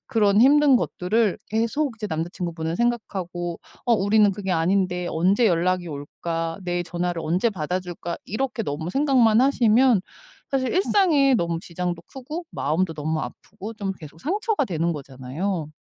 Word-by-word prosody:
그런 210 -2 +3
힘든 285 +1 +6
것들을 210 -1 0
계속 230 +5 0
이제 215 - -3
남자 165 0 -3
친구분은 165 -2 -3
생각하고 185 -7 -2 0.2
'어 240 - +3
우리는 210 0 +4
그게 195 0 -4
아닌데 180 +1 +1
언제 190 +8 +3
연락이 180 -1 +1
올까? 165 +3 -4
내 175 -1 -1
전화를 175 0 -3
언제 180 +9 +1
받아줄까?' 175 -1 -4
이렇게 245 +2 -2
너무 160 -2 -4
생각만 250 -2 +4
하시면 245 -3 +4 0.5
사실 260 -2 0
일상에 340 -8 +3
너무 170 -6 0
지장도 175 0 -4
크고 300 +6 -7
마음도 160 +3 -1
너무 155 +1 -2
아프고 210 +3 -8
좀 200 -2 -3
계속 160 -2 -13
상처가 415 - 0
되는 170 -5 -1
거잖아요. 145 +5 -4
185 Hz, 340 characters per minute, -24 LUFS, 170-235 Hz, 0.5 s, 힘든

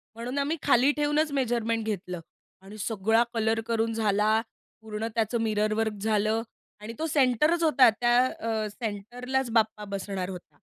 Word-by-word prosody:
म्हणून 245 +4 -5
आम्ही 290 +4 0
खाली 275 0 +4
ठेवूनच 295 +1 0
मेजरमेंट 230 -4 0
घेतलं 180 -4 -4 0.4
आणि 200 +2 -12
सगळा 225 +2 +1
कलर 225 0 +1
करून 225 -1 0
झाला, 215 0 +2 0.4
पूर्ण 220 0 -4
त्याचं 225 +1 0
मिररवर्क 215 0 0
झालं 215 +1 +1 0.4
आणि 215 +2 -7
तो 320 - -1
सेंटरच 300 +4 +2
होता, 280 -6 +6
त्या 240 +2 +1
अ, 225 -4 -2
सेंटरलाच 245 +4 -3
बाप्पा 220 -2 +1
बसणार 195 -2 -4
होता. 175 -5 -10
225 Hz, 140 wpm, -27 LUFS, 210-245 Hz, 0.4 s, होता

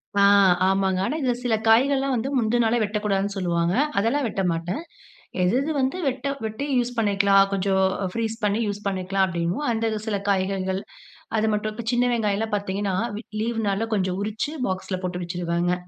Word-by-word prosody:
ஆ, 200 - +4 0.4
ஆமாங்க. 190 -1 +1
ஆனா, 295 - -1
இதில 250 -2 +1
சில 230 -3 +2
காய்கள்லாம் 270 +4 +4
வந்து, 245 +4 -1
முந்தின் 235 +1 +2
நாளே 230 +2 +2
வெட்டக்கூடாதுன்னு 205 -1 -1
சொல்லுவாங்க. 170 -1 0 0.2
அதெல்லாம் 240 +7 +1
வெட்ட 195 - -2
மாட்டேன். 170 - -3 0.6
எது, 185 +7 +2
எது, 310 +3 -2
வந்து 265 +7 0
வெட்ட 265 +1 -2 0.2
வெட்டி 220 +6 -4
யூஸ் 245 0 0
பண்ணிக்கலாம். 200 -2 +4
கொஞ்ச 195 0 -1 0.5
ஃப்ரீஸ் 225 -1 -2
பண்ணி, 210 +2 +1
யூஸ் 205 0 -5
பண்ணிக்கலாம், 190 0 0
அப்படின்னு. 170 0 -2
அந்த 225 0 0 0.2
சில 205 -2 0
காய்கறிகள், 190 0 0 0.6
அது 220 +1 +2
மட்டும் 215 +2 -4
சின்ன 245 +1 +3
வெங்காயம்லாம் 215 -1 0
பாத்தீங்கன்னா, 200 -1 -2 0.5
லீவ் 230 0 -1
நாள்ல 200 +3 0
கொஞ்சம் 185 -1 -1
உரிச்சு, 215 +8 -3
பாக்ஸ்ல 185 0 -3
போட்டு 180 0 -3
வச்சுடுவேங்க. 175 0 -1
205 Hz, 160 wpm, -24 LUFS, 190-230 Hz, 0.6 s, ஆ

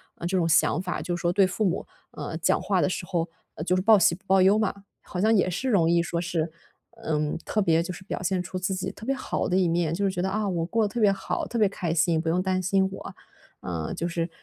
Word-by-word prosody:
呃， 170 - -5
这 190 +1 0
种 170 -2 +2
想 165 +1 +3
法， 180 -1 -3
就 175 - -2
是 - - -8
说 175 0 +1
对 195 0 +4
父 210 +4 -1
母， 185 -1 -1 0.2
呃， 160 - -5
讲 160 - +1
话 195 -2 +1
的 - - +3
时 185 - -3
候， 170 -2 -1 0.3
呃， 155 - -5
就 180 +2 +1
是 185 - +1
报 220 +2 +6
喜 175 -3 +4
不 185 +4 -10
报 190 0 +5
忧 200 +3 +5
嘛。 215 -3 +1 0.3
好 180 - -6
像 220 +2 +4
也 185 -3 +3
是 185 +10 -2
容 170 -6 +3
易 170 0 +3
说 170 0 -2
是， 170 -2 -2 0.5
嗯， 150 -6 -1
特 215 - -1
别 165 -4 +3
就 175 +2 -4
是 180 - -11
表 190 - -5
现 180 0 0
出 185 +1 -5
自 190 +1 -1
己 185 - -3
特 215 - -11
别 270 - +1
好 255 - -2
的 180 - +1
一 185 -2 +3
面， 165 -1 +1
就 195 +4 -2
是 195 - +1
觉 175 - -3
得 190 - 0
啊， 210 +1 -1
我 175 -4 -1
过 225 +6 +1
得 210 - 0
特 240 - -2
别 210 -2 +5
好， 195 -1 -3
特 235 - -4
别 215 -2 +4
开 180 -4 -3
心， 165 0 +2
不 165 - -7
用 180 +3 +1
担 185 0 0
心 190 +1 +2
我， 195 - -8 0.5
呃， 80 -3 -4
就 170 - -3
是 170 0 -2
180 Hz, 305 characters per minute, -26 LUFS, 170-195 Hz, 0.5 s, 报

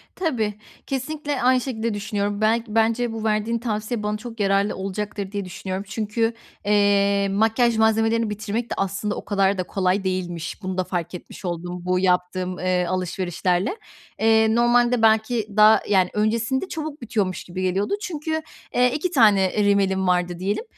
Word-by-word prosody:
Tabii, 245 - -1 0.3
kesinlikle 290 +1 -3
aynı 255 +1 +4
şekilde 230 -3 -2
düşünüyorum. 205 0 -2
Belk 225 +2 +2
bence 225 +2 +1
bu 225 -1 -5
verdiğin 220 +2 0
tavsiye 215 -1 -3
bana 210 0 -1
çok 230 +1 -9
yararlı 200 0 +2
olacaktır 195 +1 -4
diye 200 -2 -3
düşünüyorum. 185 +1 -5
Çünkü, 225 +2 -1 0.3
eee, 200 -1 +3
makyaj 225 +3 +2
malzemelerini 225 0 +2
bitirmek 215 +3 -3
de - - -2
aslında 195 +2 -2
o - - -7
kadar 195 -1 +1
da 185 - -1
kolay 190 +1 0
değilmiş. 180 -1 -3
Bunu 185 0 -3
da 185 - +1
fark 175 -2 -4
etmiş 180 - -10
oldum. 175 0 -4
Bu 180 0 +1
yaptığım, 180 0 0
eee, 180 -1 +1
alışverişlerle. 185 - -1 0.4
Eee, 220 0 +4
normalde 240 0 +3
belki 220 0 +3
daha, 215 0 +7
yani, 190 -3 +3
öncesinde 230 - 0
çabuk 310 -4 -6
bitiyormuş 205 -6 -2
gibi 180 +1 -6
geliyordu 185 - 0
çünkü, 315 -3 -3 0.3
eee, 250 0 +3
2 340 +4 -1
tane 210 - +4
rimelim 195 -2 +2
vardı 180 -1 +1
diyelim, 200 - -1
210 Hz, 155 wpm, -23 LUFS, 190-230 Hz, 0.4 s, daha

